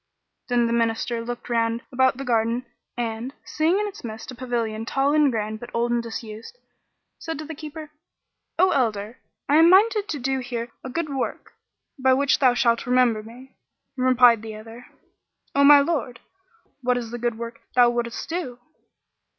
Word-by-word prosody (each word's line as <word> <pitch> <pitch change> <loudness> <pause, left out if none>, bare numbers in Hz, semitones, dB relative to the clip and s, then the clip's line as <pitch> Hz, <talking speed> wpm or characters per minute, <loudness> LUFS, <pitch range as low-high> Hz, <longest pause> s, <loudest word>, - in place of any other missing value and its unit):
Then 245 -1 +2
the 230 - 0
Minister 230 0 0
looked 240 +1 -6
round 230 0 0
about 260 0 +2
the 275 - -6
garden 235 +1 0 0.3
and, 235 +2 -4
seeing 320 +5 +1
in 420 - 0
its 410 -1 -8
midst 220 +1 -7
a - - -8
pavilion 235 -3 -3
tall 270 +4 +1
and 300 -3 +4
grand 215 -1 -3
but 240 - -9
old 235 +1 0
and 240 0 +1
disused, 225 - -8 0.6
said 325 -2 -5
to 310 - -6
the 320 - -7
keeper, 305 0 -9 0.7
"O 370 +2 +4
elder, 220 -3 -1 0.3
I 290 - +4
am 325 +1 +7
minded 420 +2 +4
to 300 - -2
do 265 0 -1
here 240 -2 -5
a 260 - -6
good 305 +2 -3
work, 265 - -4 0.5
by 260 0 +4
which 280 +1 +2
thou 255 -3 +4
shalt 235 0 +1
remember 250 -3 +3
me. 245 +5 -13 0.4
Replied 250 -3 +5
the 220 -1 -7
other, 225 +3 -11 0.7
"O 280 - +3
my 285 0 +9
lord, 280 -6 -2 0.6
what 250 0 +1
is 235 -2 -5
the 240 - -5
good 240 -1 -1
work 230 0 -7
thou 245 -1 +6
wouldest 240 0 -3
do?" 325 -8 -4
245 Hz, 175 wpm, -24 LUFS, 230-280 Hz, 0.7 s, my